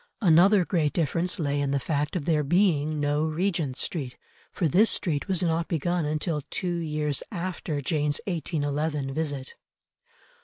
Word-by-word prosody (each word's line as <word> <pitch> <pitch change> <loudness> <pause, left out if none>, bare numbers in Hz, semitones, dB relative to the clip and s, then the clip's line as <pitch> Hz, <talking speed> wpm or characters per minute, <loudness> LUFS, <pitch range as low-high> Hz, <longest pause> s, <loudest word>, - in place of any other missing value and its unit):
Another 180 +2 +5
great 160 -5 0
difference 170 +2 0
lay 145 -3 0
in 140 - 0
the 140 0 +1
fact 145 +3 -2
of 165 -6 -2
there 155 -3 +2
being 155 -2 +2
no 145 +1 +1
Regent 160 -4 -1
Street, 135 -7 -2 0.3
for 170 - 0
this 200 +10 +4
street 155 -4 -1
was 185 -2 +1
not 165 0 0
begun 170 +1 -1
until 155 +1 -1
two 175 -2 -1
years 150 -3 -1
after 170 -4 -3
Jane's 150 0 0
1811 150 -4 -2
visit. 145 -3 -3
155 Hz, 150 wpm, -26 LUFS, 145-175 Hz, 0.3 s, Another